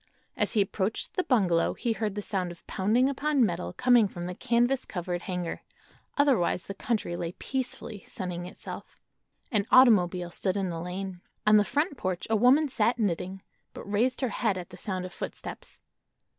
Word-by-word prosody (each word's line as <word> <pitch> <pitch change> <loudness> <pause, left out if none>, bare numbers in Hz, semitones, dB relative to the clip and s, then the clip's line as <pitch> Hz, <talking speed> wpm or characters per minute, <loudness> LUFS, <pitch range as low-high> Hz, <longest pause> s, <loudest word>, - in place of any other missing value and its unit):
As - - 0
he 215 - +4
approached 195 +1 -2
the - - +1
bungalow 190 - +2
he 235 - -1
heard 215 -2 -2
the 205 - -3
sound 185 -4 -2
of 175 - -14
pounding 220 +7 +2
upon 280 -1 +2
metal 175 -2 -2
coming 245 -4 +4
from 175 -2 -7
the 180 - -4
canvas 240 +6 +1
covered 175 -1 -4
hangar; 180 -2 -4 0.6
otherwise 255 -12 +2
the 195 - -5
country 205 -3 -2
lay 170 0 -4
peacefully 250 -5 -4
sunning 180 -2 -5
itself. 185 - -9 0.5
An 210 -3 +1
automobile 180 -8 +5
stood 190 +2 -1
in 190 -3 -1
the 165 -1 -4
lane. 180 +1 -5 0.2
On 215 0 +7
the 205 - +5
front 290 - -1
porch 185 -4 -2
a - - +4
woman 255 +8 +5
sat 235 -2 +1
knitting, 190 -2 -2 0.3
but - - -7
raised 225 +7 0
her 260 - +1
head 215 -2 0
at 180 -1 -7
the - - -9
sound 185 -3 -3
of 180 - -8
footsteps. - - -7
200 Hz, 180 wpm, -28 LUFS, 180-240 Hz, 0.6 s, On